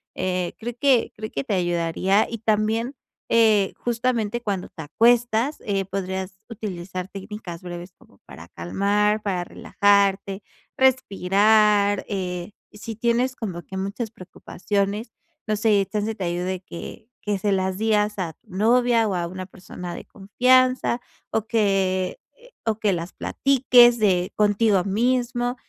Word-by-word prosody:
Eh, 185 Hz, -1 st, -2 dB
creo 240 Hz, +2 st, -5 dB
que 265 Hz, -5 st, +3 dB
creo 215 Hz, 0 st, -7 dB
que 140 Hz, -, -3 dB
te -, -, -2 dB
ayudaría 175 Hz, +2 st, +1 dB
y 230 Hz, -, -5 dB
también, 220 Hz, +4 st, 0 dB, 0.4 s
eh, 220 Hz, -4 st, +4 dB
justamente 240 Hz, -1 st, -1 dB
cuando 200 Hz, -5 st, -3 dB
te -, -, -10 dB
acuestas, 235 Hz, -, +2 dB
eh, 195 Hz, -2 st, -1 dB
podrías 190 Hz, 0 st, -4 dB
utilizar 185 Hz, -4 st, -6 dB
técnicas 195 Hz, -3 st, -8 dB
breves 175 Hz, 0 st, -8 dB
como 100 Hz, -, -23 dB
para 85 Hz, +1 st, -12 dB
calmar, 205 Hz, -, 0 dB
para 185 Hz, -4 st, -2 dB
relajarte, 200 Hz, 0 st, +1 dB, 0.3 s
respirar, 210 Hz, -4 st, +3 dB
eh, 180 Hz, -1 st, -4 dB, 0.2 s
si 220 Hz, +2 st, -7 dB
tienes 240 Hz, +3 st, +1 dB
como 185 Hz, -6 st, -5 dB
que 190 Hz, +5 st, -8 dB
muchas 200 Hz, +4 st, -4 dB
preocupaciones, 200 Hz, +3 st, -3 dB, 0.4 s
no 215 Hz, -, +1 dB
sé, 210 Hz, -2 st, +2 dB
chance 215 Hz, +1 st, -2 dB
te 195 Hz, -, -4 dB
ayude 180 Hz, +1 st, -2 dB
que 190 Hz, +4 st, -9 dB, 0.2 s
que 205 Hz, -2 st, 0 dB
se 205 Hz, +2 st, 0 dB
las 190 Hz, 0 st, 0 dB
días 210 Hz, -1 st, +1 dB
a 170 Hz, -3 st, -3 dB
tu -, -, -24 dB
novia 230 Hz, +2 st, +3 dB
o 195 Hz, -, -1 dB
a 175 Hz, -1 st, -1 dB
una 185 Hz, +1 st, -7 dB
persona 180 Hz, -2 st, -8 dB
de -, -, -9 dB
confianza 255 Hz, +4 st, +2 dB, 0.3 s
o 220 Hz, -1 st, -1 dB
que 195 Hz, -, +1 dB, 0.5 s
o 220 Hz, -1 st, +1 dB
que 210 Hz, -2 st, +2 dB
las 170 Hz, 0 st, -5 dB
platiques 250 Hz, -3 st, +4 dB
de 190 Hz, -3 st, +1 dB
contigo 205 Hz, -2 st, +3 dB
mismo 245 Hz, +4 st, 0 dB
205 Hz, 140 wpm, -23 LUFS, 185-225 Hz, 0.5 s, eh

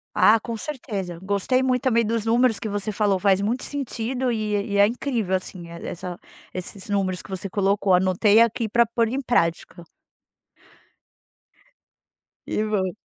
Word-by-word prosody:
Ah, 225 Hz, +1 st, +6 dB
com 230 Hz, 0 st, -5 dB
certeza. 205 Hz, -, -5 dB
Gostei 205 Hz, +7 st, +1 dB
muito 255 Hz, -1 st, +1 dB
também 235 Hz, -3 st, +3 dB
dos 225 Hz, 0 st, -1 dB
números 235 Hz, 0 st, +3 dB
que -, -, -4 dB
você 205 Hz, +1 st, -3 dB
falou, 205 Hz, -2 st, +1 dB
faz 195 Hz, 0 st, +3 dB
muito 230 Hz, +5 st, -1 dB
sentido 255 Hz, -2 st, -3 dB
e 215 Hz, -2 st, -2 dB, 0.2 s
e -, -, +1 dB
é 200 Hz, -, +7 dB
incrível 230 Hz, -4 st, -2 dB
assim, 180 Hz, -2 st, -6 dB
essa 175 Hz, +1 st, -7 dB, 0.3 s
esses 185 Hz, +2 st, -6 dB
números 190 Hz, -3 st, 0 dB
que -, -, -15 dB
você 190 Hz, 0 st, -5 dB
colocou. 200 Hz, -1 st, +1 dB
Anotei 190 Hz, +4 st, +4 dB
aqui 230 Hz, 0 st, +1 dB
pra 235 Hz, +2 st, +3 dB
pôr 230 Hz, 0 st, 0 dB
em 265 Hz, +4 st, -2 dB
prática. 175 Hz, -7 st, 0 dB, 2.6 s
Que 215 Hz, -, -1 dB
bom. 195 Hz, -4 st, 0 dB
210 Hz, 150 wpm, -23 LUFS, 190-235 Hz, 2.6 s, é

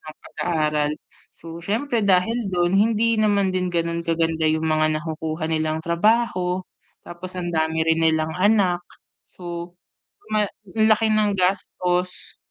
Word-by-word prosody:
sa 155 Hz, -, -10 dB
pag-aaral. 150 Hz, -3 st, -1 dB, 0.4 s
So 165 Hz, 0 st, -10 dB
siyempre 230 Hz, +7 st, -1 dB
dahil 200 Hz, +4 st, +2 dB
do'n, 175 Hz, -1 st, +1 dB
hindi 225 Hz, +1 st, +2 dB
naman 200 Hz, -2 st, +2 dB
din 185 Hz, 0 st, -1 dB
gano'n 170 Hz, -1 st, -1 dB
kaganda 165 Hz, -1 st, 0 dB
'yong 155 Hz, +1 st, 0 dB
mga 155 Hz, 0 st, +2 dB
nakukuha 160 Hz, 0 st, -4 dB
nilang 155 Hz, 0 st, -1 dB
trabaho. 185 Hz, 0 st, +1 dB, 0.4 s
Tapos 180 Hz, +1 st, -9 dB
ang 175 Hz, -1 st, -3 dB
dami 160 Hz, 0 st, 0 dB
rin 165 Hz, 0 st, +2 dB
nilang 160 Hz, -1 st, +2 dB
anak. 190 Hz, -3 st, +3 dB, 0.5 s
So 175 Hz, 0 st, -8 dB, 0.5 s
ma 215 Hz, -1 st, +2 dB, 0.3 s
laki 220 Hz, 0 st, +3 dB
ng 215 Hz, -1 st, +2 dB
gastos 180 Hz, -1 st, -1 dB
175 Hz, 130 wpm, -22 LUFS, 160-205 Hz, 0.5 s, anak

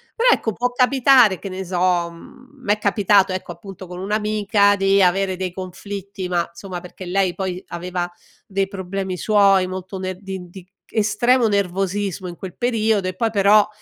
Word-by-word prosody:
però 485 Hz, +1 st, +3 dB
ecco, 220 Hz, -, -1 dB
può 245 Hz, +4 st, -1 dB
capitare, 250 Hz, -5 st, +4 dB
che 195 Hz, -, -6 dB
ne 190 Hz, +1 st, -5 dB
so, 180 Hz, -1 st, +1 dB
mhmm, 255 Hz, +11 st, -16 dB
m'è 205 Hz, -1 st, +2 dB
capitato 200 Hz, -2 st, +3 dB
ecco, 185 Hz, -1 st, -5 dB
appunto 185 Hz, +2 st, -10 dB
con 180 Hz, 0 st, -8 dB
un'amica 210 Hz, 0 st, +2 dB
di 195 Hz, 0 st, +3 dB
avere 190 Hz, +1 st, +2 dB
dei 185 Hz, 0 st, -3 dB
conflitti 190 Hz, +1 st, -7 dB
ma 175 Hz, -1 st, 0 dB
somma 180 Hz, 0 st, -7 dB
perché 180 Hz, +1 st, -10 dB
lei 185 Hz, -1 st, 0 dB
poi, 185 Hz, -1 st, -3 dB
aveva 175 Hz, 0 st, -4 dB, 0.4 s
dei 195 Hz, 0 st, -1 dB
problemi 190 Hz, -1 st, -4 dB
suoi 195 Hz, -2 st, +4 dB
molto 185 Hz, +1 st, -6 dB
ner 185 Hz, 0 st, -5 dB
di 190 Hz, -2 st, -7 dB
di 185 Hz, 0 st, -12 dB, 0.3 s
estremo 230 Hz, +3 st, +3 dB
nervosismo 195 Hz, -1 st, -1 dB
in 175 Hz, -, -7 dB
quel 185 Hz, -1 st, -8 dB
periodo 220 Hz, -5 st, +1 dB
e 185 Hz, -, -4 dB
poi 225 Hz, +3 st, 0 dB
però 205 Hz, 0 st, +5 dB
195 Hz, 170 wpm, -21 LUFS, 185-210 Hz, 0.4 s, però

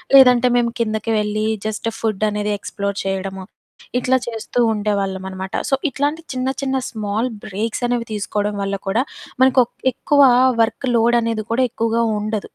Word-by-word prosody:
లేదంటే, 250 Hz, -2 st, +7 dB
మేము 240 Hz, -1 st, +2 dB
కిందకి 220 Hz, 0 st, -1 dB
వెళ్ళి 210 Hz, 0 st, -1 dB, 0.2 s
జస్ట్ 215 Hz, +1 st, -3 dB
ఫుడ్డనేది 210 Hz, -1 st, -1 dB
ఎక్స్‌ప్లోర్ 200 Hz, 0 st, -4 dB
చెయడము, 195 Hz, 0 st, -3 dB, 0.6 s
ఇట్లా 260 Hz, +1 st, +2 dB
చేస్తూ 235 Hz, +1 st, -4 dB
ఉండేవాళ్ళమనమాట. 190 Hz, -2 st, -3 dB, 0.2 s
సో, 270 Hz, -, +4 dB
ఇట్లాంటి 290 Hz, +5 st, -1 dB
చిన్న 255 Hz, 0 st, -1 dB
చిన్న 265 Hz, -1 st, 0 dB
స్మాల్ 215 Hz, +2 st, -2 dB, 0.2 s
బ్రేక్సనేవి 230 Hz, +4 st, -2 dB
తీసుకోడం 210 Hz, 0 st, -2 dB
వల్ల 200 Hz, 0 st, -1 dB
కూడా 215 Hz, +5 st, +2 dB, 0.4 s
మనకొక్ 260 Hz, -2 st, +4 dB, 0.2 s
ఎక్కువా 285 Hz, 0 st, +4 dB, 0.3 s
వర్క్ 225 Hz, +4 st, 0 dB
లోడనేది 230 Hz, -1 st, +2 dB
కూడా 255 Hz, +2 st, +3 dB
ఎక్కువగా 230 Hz, 0 st, 0 dB, 0.2 s
ఉండదు. 215 Hz, -1 st, -3 dB
220 Hz, 130 wpm, -20 LUFS, 205-245 Hz, 0.6 s, లేదంటే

